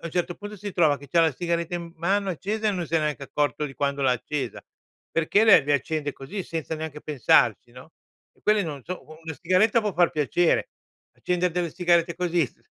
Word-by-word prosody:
un 170 - -4
certo 175 0 -1
punto 205 0 -9
si 205 0 -6
trova 155 -5 +3
che 140 +1 -13
c'ha 170 +5 +3
la 160 -1 +3
sigaretta 170 +1 -2
in 175 - -3
m 170 - -12
mano 195 +4 0
accesa, 210 +5 -3
e - - +3
non 180 -4 -3
se 165 - 0
n'è 160 - +1
neanche 150 -2 -2
accorto 150 +2 -1
di 135 - -10
quando 140 0 -1
l'ha 130 -2 +4
accesa, 130 0 -4 0.5
perché 165 +6 +2
le 210 -9 +7
le 145 0 +2
accende 145 +1 -1
così, 185 +9 -6
senza 165 -2 -4
neanche 155 -1 -6
pensarci, 120 -5 +2
no. 125 +5 -13 0.4
E - - -31
quelle 210 -1 +3
non 145 -5 -6
so 185 - -6
u 155 0 -13
una 160 -1 -6
sigaretta 190 +7 +3
può 210 -1 -1
far 175 -1 +3
piacere. 160 +2 +1 0.5
Accende 180 0 0
delle 170 0 -2
sigarette 170 0 +2
così, 175 -2 +1
s - - -23
165 Hz, 220 wpm, -25 LUFS, 150-180 Hz, 0.5 s, le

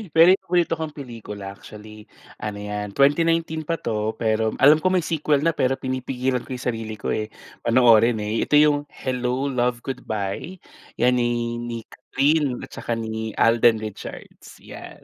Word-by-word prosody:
Pero 165 +3 +8
yung 190 - +3
paborito 175 -2 +1
kong 155 -2 -5
pelikula 110 -7 -8
actually, 105 +1 -13 0.3
ano 105 -1 -4
yan, 105 0 -5
twenty 145 +4 +4
nineteen 160 -2 -1
pa 165 - 0
to 110 -3 -2
pero 110 -1 0
alam 150 +3 +6
ko 185 - 0
may 180 -3 +2
sequel 150 -3 0
na 165 - +3
pero 135 -3 0
pinipigilan 130 0 -2
ko 130 - -4
yung 125 - -8
sarili 110 -1 -6
ko - - -4
eh, 110 - -1 0.4
panoorin 115 -1 +5
eh, 105 +2 -1
ito - - +2
yung 145 -1 +4
"Hello, 130 +1 -2
Love, 125 -1 -1
Goodbye", 115 - -4 0.4
yan 125 +1 +2
ni 120 0 -1
ni 120 -1 -5
Kathryn 140 0 0
at - - -10
tsaka 120 - -3
ni 110 -1 -4
Alden 115 0 +4
Richards, 105 -2 -9
'yan. - - -11
125 Hz, 170 wpm, -23 LUFS, 110-145 Hz, 0.4 s, Pero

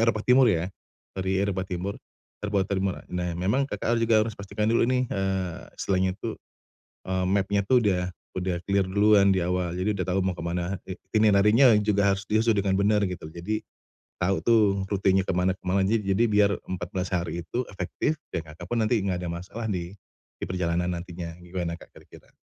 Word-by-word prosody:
Eropa 110 -2 0
Timur 125 0 +6
ya, 90 0 0 0.4
dari 95 0 -1
Eropa 95 -1 -1
Timur, 95 +3 -4 0.4
terbuat 105 -2 0
termurah. 95 -1 -2
Nah, 90 -1 -2
memang 125 +10 +1
Kakak 115 - -2
harus 115 - +2
juga, 110 -2 +5
harus 115 - -4
pastikan 105 +2 -2
dulu 115 0 +3
nih, 130 0 +2
eee, 95 -5 -2 0.2
istilahnya 95 -1 0
itu 115 0 -4 0.8
eee, 95 0 0
map-nya 100 +1 +1
tuh 125 +5 +4
udah 90 -1 0 0.2
udah 90 -1 -3
clear 100 0 +1
duluan 100 0 +4
di 95 - +1
awal, 90 -1 -1
jadi 90 +4 0
udah 100 -3 -2
tahu 95 +1 +1
mau 90 -2 -2
ke - - -5
mana, 90 +2 -2
i 95 - -5 0.2
ini 105 -1 +5
nantinya 110 +5 +6
juga 100 -1 +3
harus 95 - -6
diisi 110 +1 +3
dengan 95 -1 +1
benar 105 +1 +3
gitu. 90 -3 -6
Jadi 85 +7 -3 0.6
tahu 95 +1 +2
tuh 115 -2 +4 0.2
rutenya 95 -1 +2
ke - - -1
mana 90 +1 +2
ke 95 - -4
mana 95 +1 +2
aja 110 +4 +2
jadi 100 +2 +1
biar 105 -1 +4
14 90 +1 -4
hari 85 -1 -2
itu 120 +8 -3
efektif, 95 - -2 0.2
ya 85 -2 -4
Kakak 85 +3 -11
pun 120 - 0
nanti 110 -1 +2
enggak 95 -2 -1
ada - - -3
masalah 95 +7 -6
di, 95 -1 -4 0.4
di - - -4
perjalanan 90 -1 -1
nantinya, 85 -1 -6
gimana 90 -1 -4
Kak - - -13
kira-kira? - - -17
95 Hz, 195 wpm, -26 LUFS, 90-105 Hz, 0.8 s, Timur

